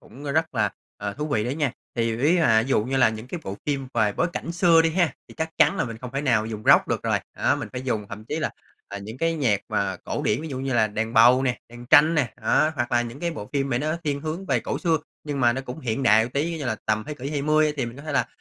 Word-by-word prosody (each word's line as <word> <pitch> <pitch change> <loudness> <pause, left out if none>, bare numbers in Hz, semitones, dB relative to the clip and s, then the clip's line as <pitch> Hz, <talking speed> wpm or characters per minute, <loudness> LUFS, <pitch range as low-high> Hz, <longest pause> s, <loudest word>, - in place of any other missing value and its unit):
cũng 135 +7 -13
rất 160 -1 0
là, 105 -4 +1 0.3
ờ, 100 0 -4
thú 150 +1 -3
vị 110 -7 0
đấy 125 +3 -2
nha. 145 -5 0 0.2
Thì 115 -1 0
ví 145 +7 +3
là 110 -9 +4
ví 130 - -6
dụ 120 - +3
như 135 +3 -1
là 125 -3 +5
những 110 +1 -6
cái 170 +6 -6
bộ 95 +1 -5
phim 140 -3 -2
về 105 -1 +2
bối 170 - +1
cảnh 170 - -4
xưa 170 -1 +5
đi 165 - +2
ha, 170 -4 +1 0.2
thì - - -13
chắc 160 0 -2
chắn 195 - +5
là - - 0
mình 115 -2 -7
không 125 0 -7
thể 140 - 0
nào 115 -7 +2
dùng 110 -1 -6
Rock - - +6
được - - -1
rồi. - - +1 0.2
Đó, - - +2
mình - - -5
phải 125 0 -5
dùng 110 -6 -2
thậm 105 +1 -8
chí 150 +7 -3
là 155 - -1 0.5
những 110 +5 -8
cái 165 0 +1
nhạc 120 -10 +1
mà - - -1
cổ - - -3
điển, - - 0
ví 160 - -5
dụ 130 - -5
như 135 0 -2
là 110 -2 +4
đàn 110 +2 -3
bầu 120 +3 +6
nè, 125 -2 0
đàn 120 0 -11
tranh 155 +3 +6
nè. 145 -6 +1
Đó, 155 - +3
hoặc 120 -2 -2
là 120 - +3
những 120 +4 -8
cái 170 -1 -1
bộ 105 -10 -7
phim 140 -1 0
mà 120 - +1
nó 155 +4 -1
thiên 140 -2 -1
hướng 160 +5 -5
về - - +1
cổ - - -3
xưa, 165 -3 +2 0.3
nhưng 145 -2 -3
mà 120 -1 +4
nó 130 - -3
cũng 135 +3 -8
hiện 125 +1 -2
đại 110 -1 +5
tí, 160 +6 -2
như 150 - -5
là 115 -4 -1
tầm 110 0 0
thế 150 - -5
kỷ 140 0 -6
20 150 +1 +2
thì 130 -4 -1
mình 115 - -8
có 140 - -10
thể 155 -1 -5
là, - - +2
130 Hz, 300 wpm, -24 LUFS, 115-155 Hz, 0.5 s, Rock